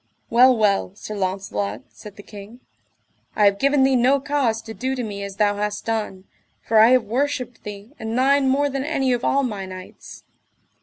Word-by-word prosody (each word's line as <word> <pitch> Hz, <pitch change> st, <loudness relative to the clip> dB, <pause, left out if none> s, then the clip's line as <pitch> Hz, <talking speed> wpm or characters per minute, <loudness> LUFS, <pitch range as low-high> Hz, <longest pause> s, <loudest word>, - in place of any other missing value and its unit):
Well 250 Hz, +1 st, +6 dB
well, 200 Hz, -3 st, +1 dB
Sir 215 Hz, -, -8 dB
Launcelot, 185 Hz, -, -3 dB
said 210 Hz, -2 st, -13 dB
the 205 Hz, -, -12 dB
king, 210 Hz, +4 st, -12 dB, 0.8 s
I 210 Hz, -, +3 dB
have 200 Hz, 0 st, +3 dB
given 275 Hz, 0 st, +3 dB
thee 265 Hz, 0 st, +3 dB
no 255 Hz, +3 st, +3 dB
cause 270 Hz, -5 st, 0 dB
to 225 Hz, -, -8 dB
do 260 Hz, +3 st, -3 dB
to 250 Hz, -, -3 dB
me 205 Hz, -3 st, -6 dB
as 200 Hz, -1 st, -7 dB
thou 205 Hz, 0 st, +1 dB
hast 210 Hz, 0 st, -3 dB
done, 215 Hz, -4 st, -3 dB, 0.4 s
for 220 Hz, -1 st, +3 dB
I 220 Hz, +2 st, +7 dB
have 255 Hz, -1 st, +4 dB
worshipped 250 Hz, +1 st, -2 dB
thee 205 Hz, +2 st, -9 dB
and 220 Hz, +2 st, -4 dB
thine 270 Hz, +1 st, +3 dB
more 285 Hz, +2 st, +2 dB
than 275 Hz, -1 st, -3 dB
any 270 Hz, -4 st, 0 dB
of 245 Hz, 0 st, -2 dB
all 275 Hz, 0 st, +2 dB
my 205 Hz, -6 st, -4 dB
knights. 185 Hz, 0 st, -11 dB
225 Hz, 195 wpm, -22 LUFS, 205-265 Hz, 0.8 s, I